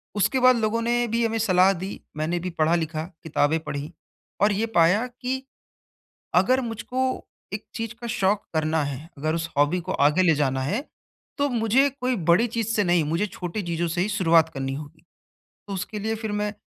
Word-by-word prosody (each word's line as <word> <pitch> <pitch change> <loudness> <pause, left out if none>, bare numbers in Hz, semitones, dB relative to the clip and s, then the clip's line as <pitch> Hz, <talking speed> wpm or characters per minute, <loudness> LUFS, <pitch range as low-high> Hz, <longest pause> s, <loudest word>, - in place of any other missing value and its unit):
उसके 210 +6 +2
बाद 255 0 +6
लोगों 230 +1 0
ने 240 +1 +1
भी 230 +1 +1
हमें 225 0 0
सलाह 190 -3 +4
दी, 190 +2 -6 0.2
मैंने 160 +3 -1
भी 180 +2 -4
पढ़ा-लिखा, 160 -1 0 0.2
किताबें 160 0 +1
पढ़ी 145 +2 -5 0.5
और 205 +1 +5
ये 210 +3 0
पाया 180 +8 +4
कि 255 +1 -4 0.9
अगर 255 +1 +4
मुझको 255 +2 -2 0.3
एक 215 - -5
चीज़ 225 0 -4
का 235 - -5
शौक़ 200 -2 +1 0.2
करना 155 0 +1
है, 145 +3 -6
अगर 155 +2 -1
उस 165 0 -2
हॉबी 145 +5 +3
को - - -4
आगे 150 +6 +3
ले 170 -3 +4
जाना 135 -3 0
है, 200 - -1 0.6
तो 285 0 +2
मुझे 240 +3 +3
कोई 255 -2 -2
बड़ी 175 +5 +3
चीज़ 230 -1 -2
से 210 - +3
नहीं 175 -3 +3
मुझे 165 +7 0
छोटी 185 +1 -5
चीज़ों 170 -1 -1
से 170 +2 -1
ही 190 - +1
शुरुआत 170 -6 +4
करनी 135 -3 -3
होगी। 150 +3 -9 0.6
तो 200 - -5
उसके 195 +3 -4
लिए 220 +2 -1
फिर 220 -1 -4
मैं 210 0 -1
190 Hz, 190 wpm, -25 LUFS, 160-225 Hz, 0.9 s, बाद